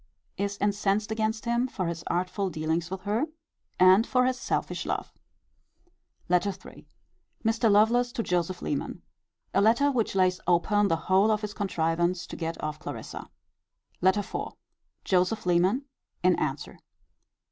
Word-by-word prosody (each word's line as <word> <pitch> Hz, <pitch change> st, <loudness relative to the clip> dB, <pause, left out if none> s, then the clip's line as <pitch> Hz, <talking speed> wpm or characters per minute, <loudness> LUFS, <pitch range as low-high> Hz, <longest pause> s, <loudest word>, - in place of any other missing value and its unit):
Is 200 Hz, 0 st, -2 dB
incensed 205 Hz, +1 st, 0 dB
against 220 Hz, +1 st, -1 dB
him 235 Hz, +2 st, +1 dB
for 190 Hz, -7 st, -3 dB
his 170 Hz, 0 st, -4 dB
artful 185 Hz, +3 st, -1 dB
dealings 160 Hz, +1 st, -2 dB
with 190 Hz, 0 st, -5 dB
her, 210 Hz, +9 st, 0 dB, 0.5 s
and 185 Hz, +4 st, +6 dB
for 250 Hz, -1 st, +3 dB
his 255 Hz, 0 st, 0 dB
selfish -, -, -2 dB
love. -, -, -3 dB, 1.1 s
LETTER 180 Hz, +2 st, +2 dB
III. -, -, -13 dB, 0.6 s
Mr. 225 Hz, 0 st, +2 dB
Lovelace 230 Hz, +4 st, +4 dB
to 230 Hz, -, -2 dB
Joseph 180 Hz, -1 st, -1 dB
Leman. 145 Hz, -, -3 dB, 0.5 s
A 195 Hz, -, +3 dB
letter 235 Hz, +7 st, +4 dB
which 230 Hz, -6 st, -1 dB
lays 185 Hz, -1 st, +2 dB
open 205 Hz, +4 st, +3 dB
the 165 Hz, -, +2 dB
whole 190 Hz, +3 st, +4 dB
of 215 Hz, -1 st, +1 dB
his 210 Hz, -1 st, -4 dB
contrivance 175 Hz, -2 st, 0 dB
to -, -, -8 dB
get 165 Hz, 0 st, -4 dB
off 155 Hz, 0 st, -3 dB
Clarissa. -, -, -7 dB, 0.7 s
LETTER 190 Hz, +3 st, +4 dB
IV. -, -, -5 dB, 0.5 s
Joseph 185 Hz, +3 st, +1 dB
Leman. 180 Hz, +10 st, +2 dB, 0.4 s
In -, -, +5 dB
answer. -, -, -3 dB
200 Hz, 145 wpm, -27 LUFS, 180-220 Hz, 1.1 s, and